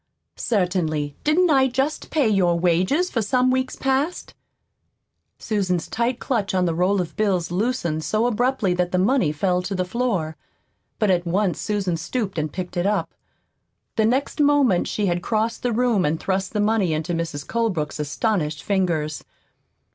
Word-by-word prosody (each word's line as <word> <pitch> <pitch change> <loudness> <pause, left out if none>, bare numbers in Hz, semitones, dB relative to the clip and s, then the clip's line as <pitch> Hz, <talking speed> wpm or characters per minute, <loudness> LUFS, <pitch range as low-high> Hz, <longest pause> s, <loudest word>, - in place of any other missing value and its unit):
"Certainly. 175 -8 -1
Didn't 330 +3 +3
I 265 -2 +5
just 270 +4 -2
pay 295 -6 +2
you 210 -2 +2
your 175 -2 +3
wages 185 - +2
for 230 - 0
some 250 +4 +2
weeks 260 0 -1
past?" 275 +6 -1 1.0
Susan's 185 -6 -1
tight 235 +2 -1
clutch 210 -7 -1
on 185 -1 +2
the 170 - 0
roll 185 +4 +2
of 175 - -6
bills 185 -6 0
loosened 180 -6 -1
so 215 +6 +1
abruptly 245 -4 +1
that 180 0 -1
the 185 - +1
money 190 - +2
fell 180 +4 0
to 195 +2 -4
the 185 0 -1
floor. 185 -7 -1 0.6
But 215 -3 +2
at 175 -1 +1
once 185 +1 0
Susan 195 -5 -1
stooped 195 -1 -3
and 155 -1 -2
picked 180 +1 -5
it 175 +2 +1
up. 210 - -1 0.8
The 220 - +2
next 270 +6 0
moment 285 -10 +3
she 210 - -1
had 175 -2 0
crossed 220 +3 -1
the 245 - 0
room 230 -4 +2
and 155 +2 0
thrust 190 0 -2
the 210 - -1
money 205 -5 +2
into 155 +3 -2
Mrs. 165 -4 -3
Colebrook's 190 -12 -1
astonished 150 0 -1
fingers. 170 -6 -1
195 Hz, 170 wpm, -23 LUFS, 175-240 Hz, 1.0 s, I